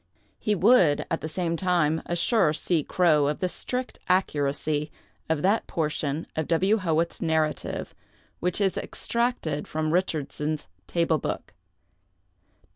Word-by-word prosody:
He 210 - +1
would, 185 -7 +4
at 165 - -1
the 155 - -4
same 170 0 -1
time, 165 -3 +1
assure 175 -1 +2
C. 160 0 0
Crowe 155 -5 +3
of 150 - 0
the 185 - 0
strict 250 +7 -4
accuracy 150 -4 0 0.4
of 160 -2 0
that 200 +4 +2
portion 155 -1 -2
of 160 -1 -1
W. 190 +6 +3
Howitt's 170 -3 0
narrative 160 -1 -1 0.5
which 180 +2 0
is 195 -2 +1
extracted 235 -11 -1
from 155 0 -1
'Richardson's 155 -3 -1 0.2
Table 165 -2 +1
Book. - - -4
165 Hz, 125 wpm, -26 LUFS, 155-185 Hz, 0.5 s, would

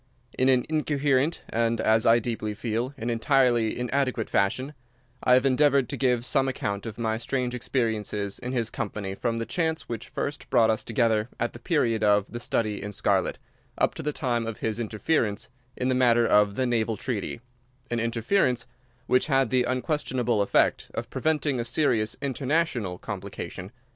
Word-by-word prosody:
In 130 +1 +3
an 130 -2 +3
incoherent 145 -1 +1
and, 115 0 0
as 110 0 +3
I 115 +1 +7
deeply 110 -2 -3
feel, 115 +4 -2
an 115 +2 -2
entirely 120 -2 +2
inadequate 125 -2 -1
fashion, 130 +9 0 0.5
I 125 - +6
have 130 +1 +3
endeavoured 135 -1 +3
to - - -2
give 125 -2 +1
some 135 +1 +2
account 100 -5 -3
of 110 - -7
my 110 -1 -1
strange 125 0 -2
experiences 110 -5 -2
in 125 0 -5
his 115 -4 -1
company 100 -3 -4
from 115 +3 -2
the 115 - -2
chance 160 +1 -1
which 115 -2 -5
first 145 - -4
brought 115 -3 +4
us 110 - -2
together 115 -1 +1
at 120 - -1
the 120 - -10
period 120 -8 +1
of 105 -1 +4
the 120 - -5
"Study 110 -3 -1
in 105 - -5
Scarlet," 100 -2 0 0.4
up - - +2
to - - -5
the 150 - -1
time 120 -6 -1
of 115 - -4
his 110 0 -2
interference 110 0 -1 0.3
in 125 - -1
the 130 - +2
matter 120 -2 +4
of 105 -2 +4
the 130 - 0
"Naval 115 -2 0
Treaty"—an 125 +1 -6
interference 115 - +1 0.4
which 125 - +2
had 135 -5 +2
the 125 -1 +3
unquestionable 125 -4 0
effect 100 - +2
of - - -4
preventing 150 -4 0
a - - 0
serious 115 -3 +1
international 135 - -1
complication. 90 +2 -7
120 Hz, 170 wpm, -26 LUFS, 110-130 Hz, 0.5 s, I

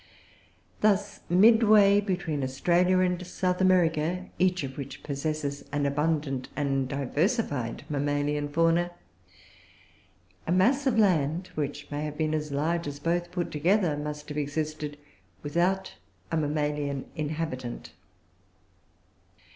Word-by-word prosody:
Thus, 205 -1 +1
midway 205 +1 +6
between 175 -8 -2
Australia 175 +8 +2
and 180 -1 0
South 180 0 -1
America, 180 -1 +2
each 185 -1 +2
of 135 -1 -5
which 140 - -7
possesses 145 0 -3
an 145 -1 0
abundant 145 -2 -1
and 135 -2 0
diversified 145 - -1
mammalian 145 0 -1
fauna, 165 +3 +2 1.6
a - - 0
mass 250 +10 +3
of 240 -4 +2
land, 175 -4 +2
which 145 -1 -4
may 145 +1 -3
have 150 -1 -5
been 155 0 0
as 150 -1 -2
large 160 +4 0
as 145 0 -5
both 175 +3 -1
put 175 -1 -3
together, 170 +1 +2
must 150 0 -5
have 150 0 -3
existed 150 0 -3 0.5
without 175 +6 0 0.4
a 165 - +1
mammalian 150 -2 -1
inhabitant. 145 - -4
155 Hz, 115 wpm, -27 LUFS, 145-180 Hz, 1.6 s, midway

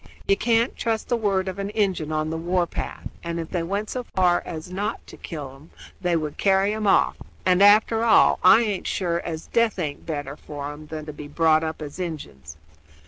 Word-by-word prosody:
You 195 - +5
can't 230 +2 +1
trust 225 -2 -2
the 240 - +3
word 195 -4 0
of 190 +1 -4
an 200 0 -3
Injun 195 -7 -1
on 155 0 -1
the - - -2
war 175 +2 +1
path, - - -6 0.2
and 170 0 -3
if 165 - -6
they 175 - -1
went 200 +5 -2
so 255 - -2
far 180 -2 +3
as 160 +2 -7
not 205 +4 -3
to - - -12
kill 145 -6 -7
'em 145 +5 -17 0.3
they 175 -2 +1
would 155 -2 -3
carry 195 +1 +3
'em 215 -1 -2
off; - - +3 0.3
and, 185 0 +4
after 215 +2 +5
all, 230 - +5
I 195 +5 +8
aint 210 -5 -2
sure 170 -3 -1
as 160 -2 -5
death 230 -3 +1
aint 150 -5 -4
better 145 -3 -4
for 145 -1 -7
'em 150 +1 -11
than 155 0 -6
to 150 - -7
be 145 0 -9
brought 155 +1 +3
up 160 -1 -4
as 145 +4 -8
Injuns. 80 - -6
175 Hz, 215 wpm, -24 LUFS, 155-200 Hz, 0.3 s, I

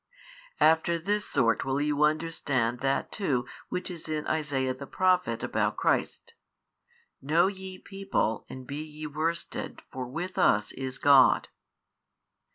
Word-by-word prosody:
After 160 +2 +4
this 205 +5 -1
sort 115 -3 +2
will 135 +1 -1
you 145 0 0
understand 150 -6 +1
that 135 +1 0
too 135 - 0 0.2
which 180 0 -3
is 165 -2 -8
in 155 -1 -2
Isaiah 140 -4 0
the 135 +2 -9
Prophet 185 +1 +1
about - - 0
Christ, 470 - 0 0.9
Know 155 +6 +3
ye 190 -1 -4
people 195 - -2
and 130 -1 -9
he 145 +2 -4
ye 155 0 -9
worsted 155 +3 -3
for 130 -1 -5
with 175 +8 -4
us 105 0 +3
is 130 0 -5
God. 140 -2 +5
150 Hz, 135 wpm, -28 LUFS, 135-175 Hz, 0.9 s, God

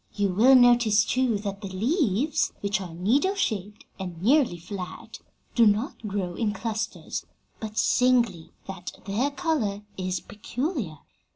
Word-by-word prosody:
You 205 -1 +1
will 230 +9 +6
notice, 240 -4 +5
too, 255 -4 +1
that 200 -1 -5
the 200 - -5
leaves, 255 - 0
which 200 -1 0
are 175 -3 -7
needle 265 - +2
shaped 210 - -2
and 180 -3 -6
nearly 245 - +3
flat, 180 +1 -8 0.3
do 235 -2 +5
not 215 +2 0
grow 195 -3 -2
in 210 +1 -1
clusters, 220 +1 -4 0.3
but 215 -1 -7
singly, 240 -10 +2 0.2
and 195 0 -5
that 180 - -8
their 220 +8 0
color 265 -9 -1
is 185 -1 -2
peculiar. 220 - -4
210 Hz, 145 wpm, -26 LUFS, 195-250 Hz, 0.3 s, will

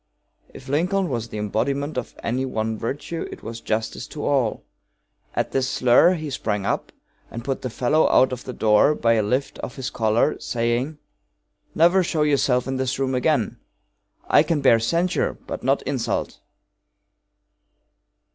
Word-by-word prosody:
If 130 - -12
Lincoln 180 +6 +1
was 115 -3 -3
the 110 - -6
embodiment 135 +8 -1
of 125 - -5
any 125 +3 -1
one 110 -4 -2
virtue 140 +9 -4
it - - -10
was 115 +1 -7
justice 110 +2 -3
to 150 - -6
all. 130 -6 +1 0.7
At - - -1
this 130 -1 0
slur 130 +10 +4
he 155 -3 -5
sprang 105 -6 -2
up - - -2 0.4
and 115 - -7
put 135 -1 -2
the 130 - -3
fellow 125 +7 +2
out 130 - +4
of 125 -1 -5
the - - -6
door 110 +5 +3
by 115 -4 +2
a 110 - +3
lift 125 +7 -1
of 125 - -6
his 135 0 -4
collar, 110 +6 +1
saying: 120 +5 -1 0.8
"Never 175 +4 +5
show 165 -3 0
yourself 135 -4 +2
in 135 0 -2
this 130 -1 -1
room 135 -1 -1
again! 125 -3 0 0.7
I - - +6
can 165 -3 0
bear 120 -4 +5
censure, 170 +10 0
but - - -5
not - - +1
insult!" - - -2
130 Hz, 160 wpm, -23 LUFS, 115-145 Hz, 0.8 s, I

